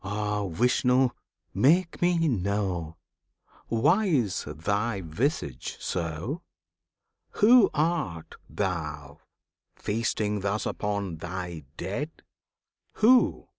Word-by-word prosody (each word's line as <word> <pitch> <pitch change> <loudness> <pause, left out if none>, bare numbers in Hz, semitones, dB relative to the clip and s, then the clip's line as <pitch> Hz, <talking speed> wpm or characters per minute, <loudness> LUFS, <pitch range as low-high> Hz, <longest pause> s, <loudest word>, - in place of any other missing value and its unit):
Ah, 105 0 -2
Vishnu! 125 +6 +3 0.4
make 170 +6 +3
me 175 -2 +3
know 95 - -1 0.7
Why 150 - +3
is 120 - 0
Thy 100 +8 -1
visage 80 - -2
so? 85 - -3 0.9
Who 235 +2 +6
art 150 - -1 0.2
Thou, 75 -5 -4 0.6
feasting 105 -1 -1
thus 100 +2 -1
upon 100 -5 -2
Thy 85 -2 -6
dead? 105 - -3 0.8
Who? 245 +3 +4
105 Hz, 85 wpm, -27 LUFS, 85-140 Hz, 0.9 s, Who